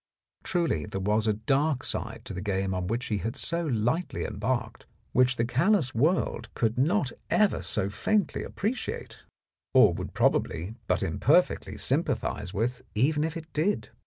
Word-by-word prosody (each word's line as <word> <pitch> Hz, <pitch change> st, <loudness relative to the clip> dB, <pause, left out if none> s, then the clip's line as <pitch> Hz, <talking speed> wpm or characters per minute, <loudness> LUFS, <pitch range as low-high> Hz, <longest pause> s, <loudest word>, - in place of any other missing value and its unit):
Truly 165 Hz, -, 0 dB
there 95 Hz, -, -4 dB
was 105 Hz, +3 st, +1 dB
a 110 Hz, -, +3 dB
dark 135 Hz, +6 st, +1 dB
side -, -, -2 dB
to -, -, -6 dB
the 95 Hz, -, -4 dB
game 95 Hz, -1 st, -1 dB
on 90 Hz, -1 st, -2 dB
which 115 Hz, +5 st, -1 dB
he 105 Hz, -2 st, -1 dB
had 115 Hz, +3 st, -3 dB
so 170 Hz, 0 st, -1 dB
lightly 120 Hz, +8 st, 0 dB
embarked, 130 Hz, -1 st, -3 dB, 0.2 s
which 125 Hz, +1 st, +4 dB
the 115 Hz, -, +1 dB
callous 140 Hz, -, +2 dB
world 130 Hz, -3 st, +1 dB
could 115 Hz, -1 st, +1 dB
not 145 Hz, +1 st, +2 dB, 0.2 s
ever 210 Hz, -2 st, +3 dB
so 95 Hz, -3 st, -1 dB
faintly 200 Hz, -, 0 dB
appreciate, 220 Hz, +6 st, -4 dB, 0.5 s
or -, -, +7 dB
would -, -, -6 dB
prob -, -, +4 dB
ably 90 Hz, +7 st, -5 dB
but -, -, +1 dB
imperfectly -, -, +2 dB
sympathize 90 Hz, -, -1 dB
with 120 Hz, +5 st, -1 dB
even 150 Hz, +7 st, +2 dB
if 160 Hz, +1 st, -2 dB
it 160 Hz, 0 st, -10 dB
did. 175 Hz, +7 st, 0 dB
125 Hz, 160 wpm, -28 LUFS, 105-160 Hz, 0.5 s, or